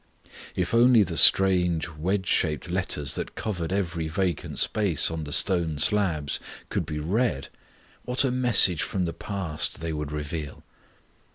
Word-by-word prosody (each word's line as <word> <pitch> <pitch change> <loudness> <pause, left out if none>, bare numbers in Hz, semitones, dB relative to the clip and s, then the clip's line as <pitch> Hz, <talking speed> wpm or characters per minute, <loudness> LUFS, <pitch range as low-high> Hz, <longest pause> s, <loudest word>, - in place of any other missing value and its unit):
If 90 +2 -2
only 120 -1 +6
the 85 -4 -4
strange 90 -1 +4
wedge 90 +5 -2
shaped 80 0 0
letters 90 -6 -1
that - - -5
covered 90 -6 -3
every 85 -4 -1
vacant 85 0 -2
space 100 -10 +2
on 80 -1 -4
the 75 - -8
stone 85 -3 0
slabs 80 -4 0 0.3
could - - -2
be 75 - -4
read, 85 - -1 0.5
what 125 +2 +1
a 135 - +1
message 120 -9 +3
from 95 -2 -1
the 85 - -3
past 95 -7 -3
they 80 0 -3
would 75 -1 -4
reveal. 75 0 -5
90 Hz, 150 wpm, -26 LUFS, 75-100 Hz, 0.5 s, only